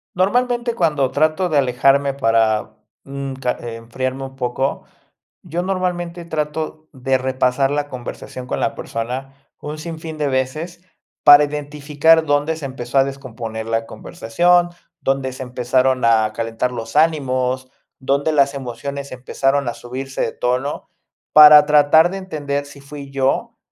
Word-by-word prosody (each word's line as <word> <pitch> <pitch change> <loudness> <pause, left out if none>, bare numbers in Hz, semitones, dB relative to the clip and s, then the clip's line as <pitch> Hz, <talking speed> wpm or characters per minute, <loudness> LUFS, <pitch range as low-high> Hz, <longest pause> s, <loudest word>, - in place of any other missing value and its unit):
Normalmente 240 +5 +1
cuando 150 - +1
trato 155 +5 +1
de 155 -4 0
alejarme 135 +1 +2
para, 115 -4 +1 0.3
mm, 140 0 -5
ca 130 -2 -1
enfriarme, 120 +3 -5
un 135 0 -11
poco. 130 +1 -2 0.6
Yo 175 +1 -3
normalmente 180 -2 -3
trato 155 0 -4
de 130 0 0
repasar 130 +1 0
la 145 0 -1
conversación 125 0 -8
con - - -3
la 140 - 0
persona, 125 +4 -5 0.3
un 150 +1 -6
sinfín 160 -1 -7
de 150 - 0
veces, 155 +7 -3 0.4
para 145 0 +9
identificar 150 +2 +1
dónde 145 +2 0
se 150 - -6
empezó 130 0 -2
a 135 - +5
descomponer 120 -5 -6
la 115 0 -1
conversación, 175 +9 +1 0.3
dónde 135 -1 -1
se 130 - -8
empezaron 125 +1 0
a 110 -2 +3
calentar 115 +2 -2
los 115 -2 -7
ánimos, 130 -5 +1 0.3
dónde 140 +3 0
las 140 -1 +3
emociones 140 +2 -6
empezaron 135 +1 -1
a 120 - -3
subirse 130 +2 -7
de - - 0
tono, 125 +4 -2 0.4
para 150 -1 +9
tratar 150 +3 +5
de 195 - -4
entender, 145 -6 -4
si 140 0 -13
fui 140 0 -10
yo 135 -1 -1
140 Hz, 140 wpm, -19 LUFS, 130-155 Hz, 0.6 s, para